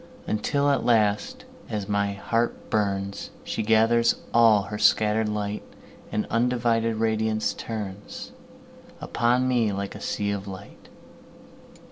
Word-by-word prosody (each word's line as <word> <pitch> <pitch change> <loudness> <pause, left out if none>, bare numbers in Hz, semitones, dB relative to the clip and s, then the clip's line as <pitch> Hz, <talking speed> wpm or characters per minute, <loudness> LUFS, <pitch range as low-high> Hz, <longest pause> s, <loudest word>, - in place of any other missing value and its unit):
Until 140 +7 +1
at 140 - +1
last, 105 -3 +1 0.2
as 105 -2 -3
my 100 -1 0
heart 115 +4 -2
burns, 100 -2 -1
She - - -3
gathers 115 +2 +4 0.2
all 115 -3 +6
her 105 +2 -6
scatter'd 110 0 +3
light, 105 0 -3 0.5
And 105 - -1
undivided 115 -1 +1
radiance 110 0 0 1.5
turnsUpon 120 +2 +1
me 120 -4 +2
like 100 0 -4
a - - -10
sea 100 0 -1
of 100 0 -4
light. 95 +1 -10
110 Hz, 115 wpm, -25 LUFS, 100-115 Hz, 1.5 s, all